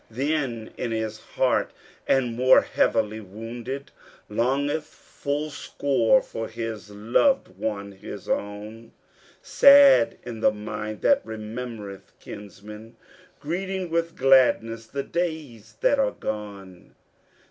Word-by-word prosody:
Then 130 -2 -2
in - - -3
his 110 -1 -3
heart 130 +3 0 0.4
the 135 - +4
more 125 +2 +4
heavily 110 +1 0
wounded, 115 +6 -7 0.4
Longeth 140 +7 0
full 150 0 -5
sore 140 +3 +1
for 115 0 -5
his 115 -2 -6
loved 115 - +1
one, 100 -2 -4
his 95 - -10
own, 105 +3 -4 0.5
Sad 280 - +7
is 115 -2 -7
the - - +4
mind 105 0 -6
that 280 0 +4
remembereth 110 -2 -7
kinsmen, 105 +2 -11 0.4
Greeting 185 +3 -3
with 165 0 -1
gladness 120 -4 +3
the 140 +4 -4
days 145 -11 -4
that 285 - +3
are 270 -1 +3
gone. 100 -4 -7
115 Hz, 110 wpm, -25 LUFS, 105-145 Hz, 0.5 s, Sad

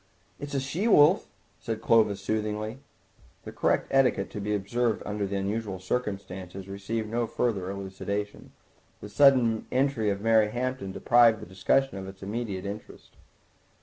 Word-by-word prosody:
"It's 145 0 -6
a - - +2
she 155 - -2
wolf," 170 -2 +5 0.3
said 115 -2 -4
Clovis 110 -3 +3
soothingly. 110 +3 -2 0.6
The - - -8
correct - - +1
etiquette 125 -8 +2
to 105 - -5
be 105 +1 -1
observed 115 +3 -1
under 105 -1 -2
the 100 - -4
unusual 100 0 -2
circumstances 95 -3 -4
received 100 +3 -4
no 115 +1 -1
further 100 -6 -1
elucidation. 100 +1 -5 0.5
The 105 - -9
sudden 120 -2 +4
entry 130 -5 +1
of 100 -1 -1
Mary 110 0 +3
Hampton 125 -3 -3
deprived 115 +2 +4
the - - -9
discussion 95 +5 0
of 95 - -7
its 95 0 -11
immediate 100 -2 -4
interest. 100 +2 -9
105 Hz, 150 wpm, -27 LUFS, 100-120 Hz, 0.6 s, wolf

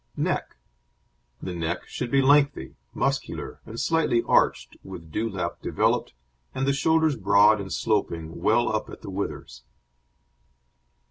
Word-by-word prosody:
NECK - - -2 0.9
The 90 - -4
neck 85 +1 -3
should 125 - -5
be 135 +2 +3
lengthy, 140 - +3 0.2
muscular, - - -3
and 115 +1 -7
slightly 160 -8 +1
arched, - - +2
with 85 -4 -10
dewlap 95 -4 -3
developed, - - 0 0.4
and 135 - -1
the 140 - +2
shoulders 160 +1 +2
broad 100 +1 +4
and 95 -1 -7
sloping, 80 -1 -2
well 120 +3 +3
up 110 - -3
at - - -11
the 100 - -7
withers. 95 -10 -5
105 Hz, 130 wpm, -25 LUFS, 90-135 Hz, 0.9 s, broad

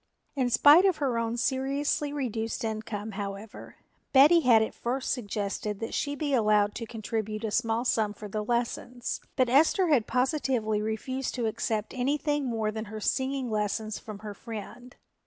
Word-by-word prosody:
In 260 -3 +1
spite 295 +9 +7
of 375 -4 +3
her 255 -5 0
own 230 +1 -2
seriously 275 +4 0
reduced 235 -6 -3
income, 220 -1 -4
however, 200 +1 -7 0.4
Betty 295 +6 +7
had 235 -7 +5
at - - -4
first 255 +2 -2
suggested 205 -3 -3
that 225 - -5
she 285 0 -1
be 290 0 -2
allowed 210 -3 +3
to 230 - -6
contribute 220 -1 -4
a 220 - -2
small 230 +1 0
sum 215 -4 +1
for 210 - -8
the 210 +1 -3
lessons, 240 +1 -2
but 255 - +3
Esther 320 +8 +4
had 260 -8 +3
positively 250 -5 0
refused 245 +5 -3
to 240 -3 -1
accept 220 -1 -2
anything 290 +3 0
more 220 -3 -1
than 220 +1 -5
her 215 +1 -7
singing 265 +2 -1
lessons 215 0 -2
from 215 -2 -8
her 210 - -5
friend. 230 +3 -9
230 Hz, 165 wpm, -28 LUFS, 215-265 Hz, 0.4 s, spite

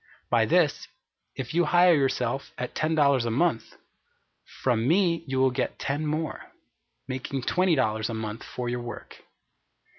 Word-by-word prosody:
By - - +3
this, - - +2 0.5
if - - -5
you 175 +1 +3
hire 175 +3 +5
yourself 135 -2 0
at 125 0 -4
ten 155 +1 0
dollars 140 -4 +3
a 120 - -1
month, 135 +1 0 0.9
from 120 -2 +1
me 170 0 +2
you 130 0 -2
will 130 0 +4
get 125 - -2
ten 145 +3 -2
more, 155 +1 -4 0.6
making 130 0 -4
twenty 180 +2 +2
dollars 110 -4 0
a 115 - -3
month 110 0 -5
for 125 -1 -5
your 120 0 -2
work. 120 0 -9
135 Hz, 155 wpm, -26 LUFS, 120-160 Hz, 0.9 s, hire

